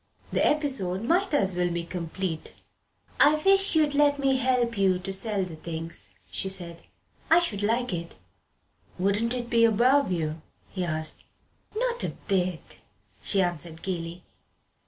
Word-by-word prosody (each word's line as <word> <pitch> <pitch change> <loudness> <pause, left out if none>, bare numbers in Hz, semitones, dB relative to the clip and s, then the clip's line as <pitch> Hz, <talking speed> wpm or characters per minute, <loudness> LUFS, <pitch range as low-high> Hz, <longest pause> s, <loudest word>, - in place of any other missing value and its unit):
The - - +2
episode 260 -11 0
might 360 +10 +2
as 200 -10 +1
well 175 0 0
be 170 0 -2
complete. 170 -1 -4 0.7
"I 295 +1 +7
wish 390 +4 +3
you'd 305 -2 +3
let 290 0 +4
me 270 -1 +2
help 250 -2 +1
you 190 -2 +3
to 190 +2 -5
sell 195 0 +1
the 175 -3 -6
things," 160 - -5 0.2
she 190 - 0
said. 175 -3 -2 0.5
"I 325 - +7
should 235 - 0
like 235 +2 0
it." 170 - -5 0.8
"Wouldn't 205 +6 +1
you 245 - -2
be 235 -1 +2
above 240 +3 +4
it?" 160 -3 -1 0.3
he 185 - -3
asked. 155 -2 -3 0.5
"Not 485 0 0
a - - -3
bit," 185 -4 -1 0.4
she 195 -2 +3
answered 170 -2 -4
gaily. 175 -1 -4
195 Hz, 150 wpm, -27 LUFS, 175-260 Hz, 0.8 s, I